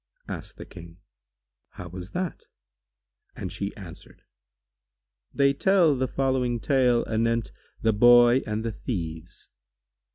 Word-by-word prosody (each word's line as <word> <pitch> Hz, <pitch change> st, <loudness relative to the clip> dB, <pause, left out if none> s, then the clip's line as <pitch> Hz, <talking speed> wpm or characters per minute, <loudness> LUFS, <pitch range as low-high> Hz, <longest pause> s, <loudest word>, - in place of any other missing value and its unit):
Asked -, -, -8 dB
the -, -, -9 dB
King, 85 Hz, -1 st, -13 dB, 0.8 s
"How 90 Hz, -, -9 dB
was 90 Hz, +1 st, -8 dB
that?" 180 Hz, +4 st, -5 dB, 0.9 s
and -, -, -6 dB
she 100 Hz, 0 st, -4 dB
answered, 90 Hz, -6 st, -13 dB, 1.1 s
"They 140 Hz, -1 st, +2 dB
tell 175 Hz, -1 st, +3 dB
the 130 Hz, 0 st, -1 dB
following 130 Hz, -3 st, -1 dB
tale 125 Hz, -3 st, +2 dB
anent 115 Hz, +1 st, 0 dB, 0.3 s
The 110 Hz, -1 st, +3 dB
Boy 120 Hz, +3 st, +6 dB
and 110 Hz, +1 st, -3 dB
the 115 Hz, -, -1 dB
Thieves. 85 Hz, -, -6 dB
115 Hz, 120 wpm, -25 LUFS, 100-130 Hz, 1.1 s, Boy